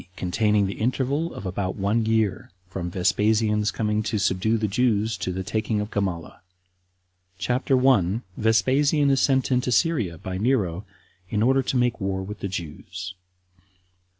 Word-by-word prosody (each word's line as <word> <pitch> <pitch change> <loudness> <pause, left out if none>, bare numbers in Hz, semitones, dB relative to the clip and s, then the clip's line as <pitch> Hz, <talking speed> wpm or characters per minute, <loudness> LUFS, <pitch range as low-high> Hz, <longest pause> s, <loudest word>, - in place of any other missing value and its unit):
Containing 105 +2 +1
The 95 - -5
Interval 135 +7 0
Of 105 - -8
About 95 0 -2
One 105 +3 0
Year. 110 -4 0 0.2
From 90 -2 -4
Vespasian's 105 +3 +1
Coming 105 -1 -1
To 110 0 -2
Subdue 100 +3 +1
The 110 -1 0
Jews 110 0 +1
To 90 0 -3
The 95 +1 -4
Taking 110 +2 -1
Of 105 +1 -4
Gamala. 90 -7 -3 1.0
CHAPTER 125 +7 +1
1. 115 -5 +3
Vespasian 140 +6 +3
Is 135 - +2
Sent 135 -1 +2
Into 125 0 +1
Syria 115 - +1
By 95 +2 -5
Nero 105 -6 0 0.4
In 105 0 0
Order 135 +3 +4
To 130 0 -1
Make 120 -2 +1
War 95 0 -2
With 105 +2 -7
The - - -3
Jews. 90 +1 -6
105 Hz, 150 wpm, -24 LUFS, 95-125 Hz, 1.0 s, Order